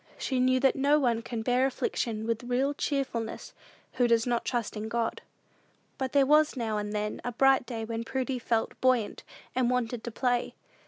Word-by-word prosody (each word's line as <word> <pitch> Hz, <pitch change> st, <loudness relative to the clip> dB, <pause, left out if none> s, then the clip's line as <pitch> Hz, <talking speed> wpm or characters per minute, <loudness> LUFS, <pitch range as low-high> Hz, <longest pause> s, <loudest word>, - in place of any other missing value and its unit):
She 260 Hz, -2 st, -1 dB
knew 255 Hz, 0 st, +3 dB
that 270 Hz, -1 st, +4 dB
no 280 Hz, +2 st, +3 dB
one 235 Hz, -5 st, +1 dB
can 230 Hz, -1 st, -5 dB
bear 250 Hz, +3 st, +3 dB
affliction 225 Hz, -4 st, -2 dB
with 230 Hz, +1 st, -2 dB
real 260 Hz, +3 st, +1 dB
cheerfulness 270 Hz, -6 st, -3 dB, 0.4 s
who 245 Hz, -, +2 dB
does 230 Hz, -1 st, +3 dB
not 240 Hz, -1 st, 0 dB
trust 240 Hz, -4 st, -2 dB
in 215 Hz, +1 st, -4 dB
God. 230 Hz, 0 st, -1 dB, 0.8 s
But 260 Hz, -1 st, -2 dB
there 280 Hz, -1 st, +4 dB
was 300 Hz, 0 st, +4 dB
now 220 Hz, -3 st, -1 dB
and 210 Hz, 0 st, -4 dB
then 210 Hz, 0 st, -3 dB
a 245 Hz, -, -2 dB
bright 270 Hz, +1 st, +3 dB
day 225 Hz, -3 st, -4 dB
when 230 Hz, 0 st, -3 dB
Prudy 260 Hz, +1 st, -2 dB
felt 230 Hz, -2 st, 0 dB
quite -, -, -22 dB
buoyant, 255 Hz, -5 st, +1 dB, 0.3 s
and 250 Hz, -2 st, +1 dB
wanted 245 Hz, -2 st, -1 dB
to 240 Hz, -, -4 dB
play. 245 Hz, +1 st, -1 dB
245 Hz, 195 wpm, -29 LUFS, 230-260 Hz, 0.8 s, that